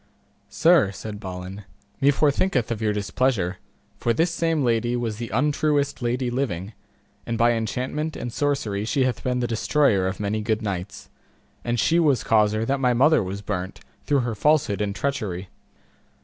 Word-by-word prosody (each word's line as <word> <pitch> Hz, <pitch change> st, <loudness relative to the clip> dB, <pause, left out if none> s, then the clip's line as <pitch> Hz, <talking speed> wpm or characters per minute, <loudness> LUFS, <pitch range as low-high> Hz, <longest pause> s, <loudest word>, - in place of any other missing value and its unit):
Sir, 165 Hz, -, +4 dB
said 105 Hz, +1 st, -7 dB
Balin, 95 Hz, 0 st, -7 dB, 0.4 s
me 140 Hz, 0 st, +4 dB
forthinketh 145 Hz, -, +1 dB
of 115 Hz, -1 st, -3 dB
your 110 Hz, -1 st, +1 dB
displeasure, 100 Hz, -2 st, 0 dB, 0.4 s
for 120 Hz, -, +1 dB
this 165 Hz, +8 st, +1 dB
same 165 Hz, -3 st, 0 dB
lady 120 Hz, 0 st, +1 dB
was 115 Hz, -3 st, -2 dB
the 115 Hz, -1 st, -5 dB
untruest 145 Hz, +3 st, +1 dB
lady 120 Hz, +1 st, -1 dB
living, 110 Hz, -6 st, -2 dB, 0.5 s
and 115 Hz, -, -1 dB
by 120 Hz, +1 st, +4 dB
enchantment 125 Hz, +7 st, -2 dB
and 120 Hz, -, -5 dB
sorcery 125 Hz, -9 st, -1 dB
she 130 Hz, +5 st, +1 dB
hath 130 Hz, -1 st, -1 dB
been 125 Hz, -1 st, 0 dB
the -, -, 0 dB
destroyer 115 Hz, -4 st, +2 dB
of 95 Hz, -, -4 dB
many 105 Hz, +1 st, -1 dB
good 110 Hz, +1 st, -1 dB
knights, 100 Hz, 0 st, -5 dB, 0.5 s
and 120 Hz, 0 st, -1 dB
she 165 Hz, +7 st, +3 dB
was 145 Hz, -8 st, +3 dB
causer 110 Hz, 0 st, +2 dB
that 140 Hz, +3 st, 0 dB
my 125 Hz, -2 st, +2 dB
mother 150 Hz, +6 st, +5 dB
was 100 Hz, +1 st, -5 dB
burnt, 95 Hz, -2 st, -4 dB, 0.3 s
through 145 Hz, -3 st, +3 dB
her 120 Hz, -2 st, -2 dB
falsehood 120 Hz, -4 st, +2 dB
and 100 Hz, -1 st, -2 dB
treachery. 105 Hz, -11 st, -3 dB
115 Hz, 165 wpm, -24 LUFS, 105-140 Hz, 0.5 s, mother